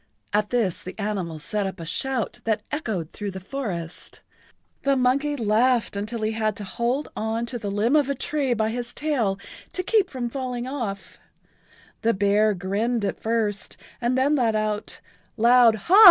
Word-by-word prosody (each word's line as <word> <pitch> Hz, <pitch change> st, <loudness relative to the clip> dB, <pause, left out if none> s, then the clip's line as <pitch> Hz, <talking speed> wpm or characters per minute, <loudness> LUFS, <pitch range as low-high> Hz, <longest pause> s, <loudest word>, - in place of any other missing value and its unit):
At 210 Hz, 0 st, +2 dB
this 225 Hz, -8 st, +1 dB
the 185 Hz, -, -8 dB
animals 185 Hz, -7 st, -3 dB
set 210 Hz, -2 st, -1 dB
up 190 Hz, -1 st, -6 dB
a 165 Hz, -, -6 dB
shout 255 Hz, +8 st, -2 dB
that 220 Hz, -2 st, 0 dB
echoed 215 Hz, -, -3 dB
through 205 Hz, -1 st, -4 dB
the 190 Hz, 0 st, -6 dB
forest. 185 Hz, -7 st, -5 dB, 0.6 s
The 275 Hz, -1 st, +2 dB
monkey 275 Hz, +4 st, +2 dB
laughed 230 Hz, 0 st, +2 dB
until 215 Hz, +3 st, -3 dB
he 215 Hz, -, +1 dB
had 215 Hz, -2 st, 0 dB
to 205 Hz, -, -6 dB
hold 235 Hz, +8 st, -1 dB
on 225 Hz, +2 st, -1 dB
to 240 Hz, 0 st, -4 dB
the 205 Hz, -3 st, -3 dB
limb 210 Hz, +7 st, +2 dB
of 290 Hz, -2 st, +3 dB
a 280 Hz, -, +1 dB
tree 270 Hz, -2 st, 0 dB
by 220 Hz, 0 st, +1 dB
his 240 Hz, 0 st, -4 dB
tail 250 Hz, -11 st, 0 dB, 0.4 s
to 365 Hz, -, -1 dB
keep 400 Hz, -1 st, +3 dB
from 255 Hz, -5 st, -3 dB
falling 250 Hz, -1 st, -3 dB
off, 235 Hz, -8 st, -5 dB, 0.8 s
the 230 Hz, -1 st, +2 dB
bear 205 Hz, +2 st, +3 dB
grinned 205 Hz, +5 st, 0 dB
at 195 Hz, -, -3 dB
first 220 Hz, -2 st, -1 dB, 0.2 s
and 245 Hz, +2 st, +1 dB
then 275 Hz, +3 st, +3 dB
let[Pg 255 Hz, -4 st, +2 dB
79] 215 Hz, 0 st, +2 dB
out 210 Hz, 0 st, -3 dB, 0.4 s
loud 235 Hz, 0 st, +6 dB
ha! 345 Hz, -, +4 dB
225 Hz, 180 wpm, -25 LUFS, 205-255 Hz, 0.8 s, loud